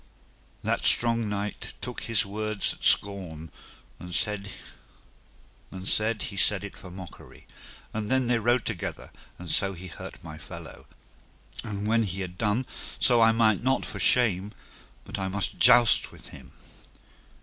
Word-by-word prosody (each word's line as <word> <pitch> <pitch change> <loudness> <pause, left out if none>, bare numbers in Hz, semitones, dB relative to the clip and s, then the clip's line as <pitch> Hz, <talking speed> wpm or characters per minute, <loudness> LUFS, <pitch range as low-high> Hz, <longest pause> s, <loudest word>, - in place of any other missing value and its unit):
That - - -1
strong 115 -2 +3
knight 105 0 -4
took - - -5
his 115 -3 +3
words 110 +1 -2
at - - -16
scorn, 90 -6 0 0.5
and 90 0 -6
said 105 -2 0 1.8
he 100 - -5
said 100 +1 +4
it 100 - -8
for 90 - -11
mockery. 90 -1 -11 0.5
And 105 -1 -3
then 130 0 +2
they 120 -1 +1
rode 120 +3 +1
together, 105 -7 -5 0.3
and 90 - -10
so 100 0 +2
he 90 +1 -10
hurt 85 - -10
my 75 0 -9
fellow. 75 - -11 0.8
And 105 -1 -5
when 115 +1 +3
he 95 -3 -2
had 90 -1 -7
done 110 +4 0 0.3
so 120 -2 +5
I 115 0 +6
might 110 -3 +3
not 130 +2 +1
for - - -7
shame 105 -5 +2 0.5
but - - -6
I 95 - -2
must 95 0 -2
joust 120 -1 +6
with - - -13
him. 65 0 -13
105 Hz, 150 wpm, -27 LUFS, 95-115 Hz, 1.8 s, I